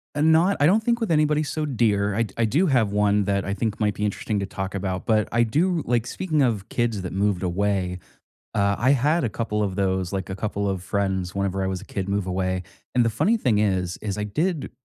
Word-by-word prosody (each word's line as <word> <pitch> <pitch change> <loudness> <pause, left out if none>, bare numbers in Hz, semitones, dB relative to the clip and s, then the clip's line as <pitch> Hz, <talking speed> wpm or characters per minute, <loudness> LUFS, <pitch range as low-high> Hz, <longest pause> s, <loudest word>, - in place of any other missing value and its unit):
Eh, 145 - 0
not 160 +5 +4
I 145 - +4
don't 210 +7 +4
think 235 0 +1
with 225 -6 -1
anybody 150 -1 +3
so 155 +1 -2
dear, 105 -6 +1
I 115 - +2
d 100 -4 -8
I 115 - +2
do 150 - +2
have 120 -8 +2
one 105 0 +2
that 100 -1 0
I 100 - -2
think 105 +1 -2
might 105 -2 +1
be 105 - -1
interesting 105 0 -2
to 100 - -2
talk 95 0 -5
about, 95 -1 -3
but 110 -2 +2
I 120 +1 +3
do 165 +8 +1
like, 120 -1 +1
speaking 155 -2 -1
of 110 -6 0
kids 115 -4 -1
that 90 - -5
moved 100 -1 0
away, 90 0 -1 0.5
uh, 100 -1 +2
I 130 +3 +3
had 145 +5 +2
a 120 - 0
couple 105 -1 -2
of 95 -2 -2
those 95 -2 0
like, 95 -1 -3
a 95 - -3
couple 100 -1 -2
of 95 -2 -3
friends 95 -2 -1
whenever 95 -1 -1
I - - 0
was 95 0 -3
a - - -11
kid 100 -1 -4
move 100 -1 -1
away, 95 0 -1 0.3
and 120 -1 +4
the 115 - +3
funny 160 - +2
thing 115 - +1
is, 95 -4 0
is 105 -2 -3
I 105 - -2
did 155 - -2
105 Hz, 245 wpm, -24 LUFS, 95-130 Hz, 0.5 s, not